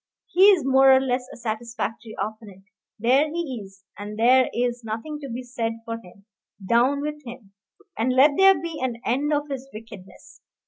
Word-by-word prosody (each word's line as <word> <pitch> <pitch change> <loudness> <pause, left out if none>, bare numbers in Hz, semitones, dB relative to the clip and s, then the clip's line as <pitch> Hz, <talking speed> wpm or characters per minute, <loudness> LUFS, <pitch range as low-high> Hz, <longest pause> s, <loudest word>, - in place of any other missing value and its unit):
he 370 +2 +4
is 380 -9 +5
more 270 0 +5
or 265 - +6
less 255 -1 -2
a - - -11
satisfactory 225 -1 -5
opponent. 210 -3 -6 0.3
There 260 +7 +2
he 300 -8 -4
is, 195 0 -17 0.2
and 210 +1 -7
there 250 +3 +4
is 245 0 -2
nothing 225 +8 -5
to 280 -2 -8
be 245 +2 -5
said 235 -2 -3
for 230 0 -5
him 195 -1 -18 0.4
down 250 +6 +2
with 300 0 -5
him! 235 -5 -11 0.5
and 240 +3 +1
let 265 +4 +5
there 385 +2 +5
be 330 -2 -6
an 245 -3 -3
end 280 +6 0
of 295 0 0
his 270 -1 -6
wickedness. 215 -4 -13
250 Hz, 180 wpm, -24 LUFS, 225-280 Hz, 0.5 s, or